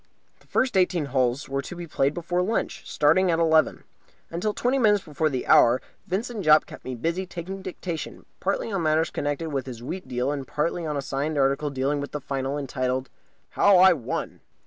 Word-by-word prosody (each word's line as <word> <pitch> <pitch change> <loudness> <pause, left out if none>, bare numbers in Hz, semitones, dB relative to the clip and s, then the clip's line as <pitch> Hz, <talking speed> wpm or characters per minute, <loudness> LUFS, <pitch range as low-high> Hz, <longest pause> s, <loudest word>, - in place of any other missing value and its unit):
The - - -26
first 255 -3 +1
eighteen 180 -4 +2
holes 130 0 0
were 135 0 -2
to 160 - -8
be 175 0 -6
played 145 -2 0
before 175 +1 -1
lunch, 215 +5 -2
starting 180 +5 +3
at 165 - +2
eleven. 160 -1 +3 0.5
Until 175 +6 -1
twenty 250 +5 0
minutes 210 -4 +4
before 155 0 -1
the 130 -3 -3
hour 120 +2 +6 0.3
Vincent 215 +3 -3
Jopp 155 -1 +6
kept - - -12
me 130 - -5
busy 170 +9 -2
taking 185 +3 -6
dictation, 175 -3 -6
partly 200 +3 -1
on 195 -3 -1
matters 155 0 +2
connected 145 +3 -2
with 135 -2 -2
his 120 -2 -8
wheat 185 +8 -6
deal 125 +2 -1
and 140 -3 -4
partly 165 +2 -1
on 150 -1 -2
a 140 - -3
signed 145 +3 -2
article 140 +2 +2
dealing 140 +1 -1
with 140 - -7
the 150 - -2
Final, 135 0 -3
entitled 130 -1 -2 0.4
"How 200 -2 +5
I 185 0 +8
Won." 135 -9 -4
155 Hz, 195 wpm, -25 LUFS, 135-180 Hz, 0.5 s, I